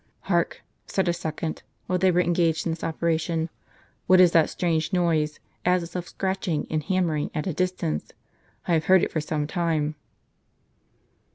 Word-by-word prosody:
" - - -44
Hark! - - +1
" - - -45
said 190 -2 0
a 175 - +3
second, 160 -1 -4 0.2
while 180 0 0
they 190 +1 +4
were 180 0 +3
engaged 170 -2 +1
in 170 - 0
this 160 - -5
operation; 165 0 0 0.6
"what 185 0 +6
is 180 -2 +7
that 165 -2 +4
strange 165 -2 0
noise, 160 -4 +1 0.2
as 180 0 +2
if 170 - -10
of 175 -1 -4
scratching 190 -5 -2
and 155 -1 +1
hammering 170 -4 0
at 155 - -1
a 185 - -1
distance? 180 - -2 0.6
I 175 - +2
have 160 -1 +2
heard 190 -1 +5
it - - 0
for 155 - -1
some 150 0 -2
time." 160 -2 0
170 Hz, 180 wpm, -25 LUFS, 155-180 Hz, 0.6 s, is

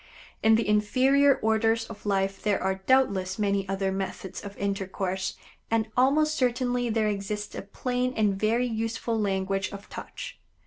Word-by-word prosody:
In 220 0 +6
the 225 -1 +1
inferior 260 +7 +4
orders 225 +1 +2
of 210 -2 -10
life 195 -1 0
there 205 -2 +1
are 190 0 -1
doubtless 195 -8 +3
many 200 -2 0
other 195 0 0
methods 190 -1 -4
of 200 -1 -8
intercourse, 190 -1 -2 0.3
and 225 -1 +1
almost 295 +5 +3
certainly 245 -2 0
there 220 -1 +1
exists 205 0 -3
a - - -5
plain 250 +5 -2
and 210 -2 +3
very 220 +5 +1
useful 225 0 -2
language 195 -1 0
of 200 0 -9
touch. - - -8
210 Hz, 150 wpm, -27 LUFS, 195-235 Hz, 0.3 s, In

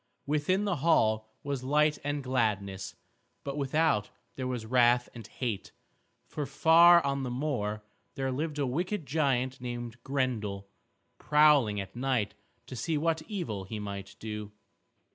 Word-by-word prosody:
Within 150 +7 +1
the 200 -5 0
hall 110 -8 +2
was 140 -3 -3
light 150 +2 +2
and 145 0 -2
gladness, 100 -8 -1 0.5
but 140 -1 -4
without 140 -6 +1 0.3
there 130 -1 -3
was 125 -3 -3
wrath 120 +1 +4
and 115 -3 -9
hate. 115 -6 -4 0.5
For 145 -2 -5
far 170 0 +6
on 140 0 0
the 130 - -3
moor 120 -6 -2 0.3
there 135 -2 -1
lived 150 +3 -3
a 145 - +1
wicked 175 +7 -2
giant 130 -4 0
named 120 -1 -6
Grendel, 110 -8 -2 0.5
prowling 150 -8 +4
at 100 +3 -7
night 125 -4 0 0.3
to - - -8
see 150 +7 -1
what 160 +1 0
evil 155 - -4
he 110 +3 -6
might 100 -1 -6
do. 105 -1 -6
130 Hz, 145 wpm, -30 LUFS, 110-150 Hz, 0.5 s, far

